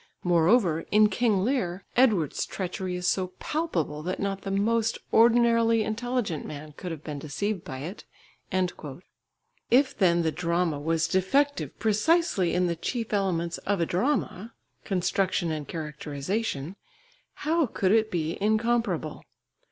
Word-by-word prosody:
Moreover 175 0 +3
in 210 0 +5
King 210 -2 +1
Lear, 195 -7 -1
Edward's 215 - +2
treachery 185 -1 -4
is 180 0 -2
so 185 -1 0
palpable 170 - -2
that 180 +4 -3
not 195 -1 -2
the 195 - -5
most 225 +3 +1 0.2
ordinarily 230 -1 +4
intelligent 220 - -2
man 150 0 -8
could 180 - -6
have 160 -3 -7
been 150 -2 -5
deceived 175 +7 -3
by 130 -2 -7
it!" 180 +9 -7 1.7
If 265 +2 +4
then 170 -3 +3
the 160 - +1
drama 170 -2 0
was 165 +2 0
defective 275 +10 +1
precisely 215 - +2
in 180 0 +2
the 170 -1 0
chief 225 +6 -4
elements 170 -4 0
of 200 -1 -1
a 170 - +2
drama, 225 - -1 0.3
construction 185 -2 0
and 155 -2 -4
characterisation, 155 +3 -4 0.7
how 320 -1 +2
could 195 -3 0
it 220 0 +3
be 165 -3 -2
incomparable? 215 -7 0
190 Hz, 135 wpm, -27 LUFS, 165-225 Hz, 1.7 s, in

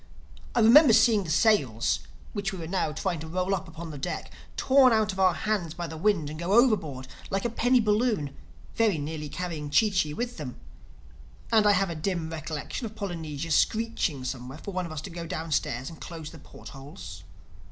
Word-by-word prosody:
I 240 - +4
remember 240 +3 +8
seeing 215 -4 +5
the - - -6
sails, 155 - +2 0.3
which 205 0 -2
we 190 - -6
were 165 - -6
now 170 -2 -1
trying 160 +2 -2
to 160 - -7
roll 185 +3 -1
up 185 - -2
upon 165 0 -8
the 145 - -7
deck, - - -4 0.3
torn 265 -1 +5
out 215 -2 +2
of 190 - -8
our 185 -1 +4
hands 195 -7 -2
by 175 0 -4
the 160 - -7
wind 170 -2 +1
and 155 +1 -7
go 175 +3 -1
overboard 180 - +3 0.2
like 195 +1 -1
a 240 - 0
penny 245 +2 +3
balloon—very 210 - 0
nearly 150 0 -5
carrying 160 -3 -4
Chee 215 +8 +4
Chee 155 -6 +1
with 245 +1 -4
them. 135 -6 -7 0.9
And 220 -2 +5
I 205 - +6
have 195 -1 +1
a - - -4
dim 165 0 -2
recollection 160 - -5
of 215 - -12
Polynesia 165 -6 -5
screeching 215 - +1
somewhere 130 +1 -5
for 200 - -7
one 180 -1 -2
of - - -10
us 155 -2 -5
to 190 - -8
go 170 0 -6
downstairs 150 -6 -2
and 165 - -13
close 160 -3 -7
the 160 - -12
port - - -13
holes. 90 - -10
170 Hz, 200 wpm, -27 LUFS, 150-210 Hz, 0.9 s, remember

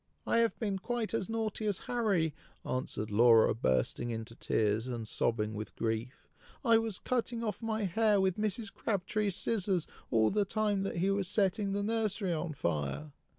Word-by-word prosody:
"I - - +2
have 230 -1 +2
been 200 -4 -2
quite 235 +1 -2
as 225 -2 -1
naughty 220 -1 -2
as 200 -3 +1
Harry!" 200 -10 +1 0.3
answered 110 -4 -3
Laura, 115 +1 +6
bursting 105 - 0
into 115 0 -4
tears 110 +1 0
and 120 -3 -4
sobbing 110 -1 0
with 105 +1 -6
grief; 115 +3 -3 0.4
"I 230 -2 +6
was 225 -4 -3
cutting 235 -1 -1
off 215 -1 -3
my 220 -1 -1
hair 205 +2 +3
with 190 -2 +2
Mrs. 215 0 -2
Crabtree's 205 -1 -1
scissors 195 -6 +1 0.2
all 110 -2 +3
the 210 0 +2
time 205 0 0
that 195 -2 -3
he 190 +3 +2
was 195 -2 0
setting 200 +1 +2
the 200 0 -1
nursery 215 -4 0
on 160 0 -3
fire!" 75 - -2
195 Hz, 170 wpm, -32 LUFS, -, 0.4 s, Laura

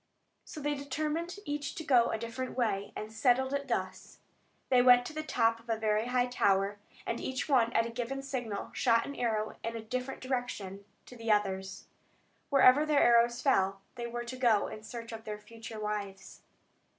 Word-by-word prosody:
So - - -8
they 295 0 -1
determined 305 +5 -3
each 290 -1 -3
to 320 - -5
go 250 -6 +4
a - - -1
different 235 +3 -5
way, 205 -5 0
and 215 +1 -6
settled 260 +3 +2
it 280 0 -2
thus. - - -4 0.5
They 255 -1 +5
went 245 0 +6
to - - -6
the 310 - -3
top 230 -7 +1
of 230 +1 -20
a 225 - +1
very 215 +1 +1
high 250 0 +2
tower, 200 -4 +1 0.3
and 230 - -2
each 260 0 -3
one 245 -5 +3
at 230 - +3
a 230 - -5
given 250 +3 -4
signal 245 -7 -4
shot 230 -2 +3
an 280 - -6
arrow 220 -3 -1
in 230 0 -3
a - - -3
different 250 +3 -4
direction 230 -7 -4 0.2
to 250 - -12
the 230 -2 -1
others. 195 -1 -1 0.6
Wherever 275 0 +6
their 305 -2 +3
arrows 235 0 +4
fell 195 -7 +2
they 235 -1 -5
were 240 0 -5
to 245 +2 -6
go 235 -5 +3
in 215 - -7
search 230 +1 -8
of 225 -1 -7
their 210 -1 -5
future 225 +1 -10
wives. 205 -2 -5
235 Hz, 190 wpm, -31 LUFS, 215-260 Hz, 0.6 s, went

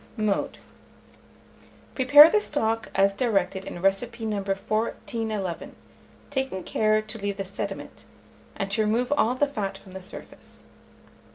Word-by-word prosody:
Mode. 215 -2 -1 1.4
Prepare 285 +4 +9
the 425 +5 +2
stock 225 - -1
as 195 +1 +4
directed 200 -4 0
in 175 - -7
recipe 225 +4 0
No. 215 -1 -1
1411, 210 0 -3 0.6
taking 265 -9 -2
care 215 0 +1
to 215 +1 -7
leave 200 0 -3
the 195 - -3
sediment, 195 - -6 0.5
and 195 0 -3
to 220 - +1
remove 230 +5 +1
all 250 -3 +2
the 290 - +2
fat 205 -9 -4
from 190 - -16
the 190 0 -8
surface. 185 - -12
215 Hz, 130 wpm, -26 LUFS, 195-240 Hz, 1.4 s, Prepare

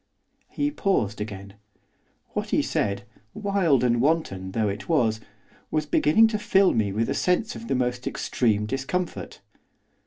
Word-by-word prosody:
He 290 0 -1
paused 115 - 0
again. 100 -2 -7 0.8
What - - -4
he - - +2
said, 100 0 -1 0.3
wild 195 - +2
and 120 -1 +2
wanton 120 - 0
though 110 -2 +1
it 100 +8 -5
was, 115 -9 +2 0.5
was 155 -1 0
beginning 150 +8 +4
to 215 -2 -2
fill 195 -2 +3
me 110 -4 +1
with 110 +3 0
a - - 0
sense 180 +5 0
of 230 - -8
the - - 0
most 125 0 -1
extreme 105 -4 0
discomfort. 135 +9 -3
130 Hz, 150 wpm, -25 LUFS, -, 0.8 s, beginning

